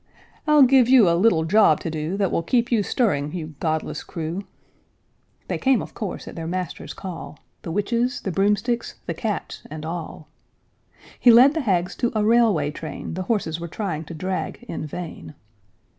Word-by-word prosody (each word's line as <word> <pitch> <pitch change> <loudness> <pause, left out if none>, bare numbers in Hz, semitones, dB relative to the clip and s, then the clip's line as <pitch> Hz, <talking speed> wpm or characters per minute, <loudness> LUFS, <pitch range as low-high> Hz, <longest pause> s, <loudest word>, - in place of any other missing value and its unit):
I'll 300 -2 +7
give 255 -2 +5
you 255 -7 +7
a 170 - +4
little 170 -3 +3
job 180 -4 +5
to 165 - -3
do 160 +4 -3
That 195 -2 +1
will - - +1
keep 240 +8 +1
you 230 -3 +3
stirring, 150 - 0
you 160 -3 -5
godless 160 -1 -2
crew!" 165 +3 -4 1.1
They - - -2
came, 265 -3 +3
of - - -7
course, 210 -5 -5
at - - -8
their 165 -1 -5
master's 180 0 -4
call, 165 -6 -7 0.2
The - - -7
witches, 235 +7 0
the 190 - -3
broomsticks, 210 +6 0
the 170 - -2
cats, 205 +4 -4
and 155 +1 -7
all; 165 -2 -6 0.9
He 245 - +5
led 250 +5 +8
the 320 - -1
hags 185 -7 0
to 240 - 0
a 210 -1 +2
railway 215 -10 +3
train 155 0 -7
The 185 - -3
horses 170 -8 0
were 170 - -5
trying 170 -3 -4
to 165 - -8
drag 185 +7 -4
in 165 -9 -5
vain. 150 - -8
185 Hz, 180 wpm, -23 LUFS, 160-230 Hz, 1.1 s, led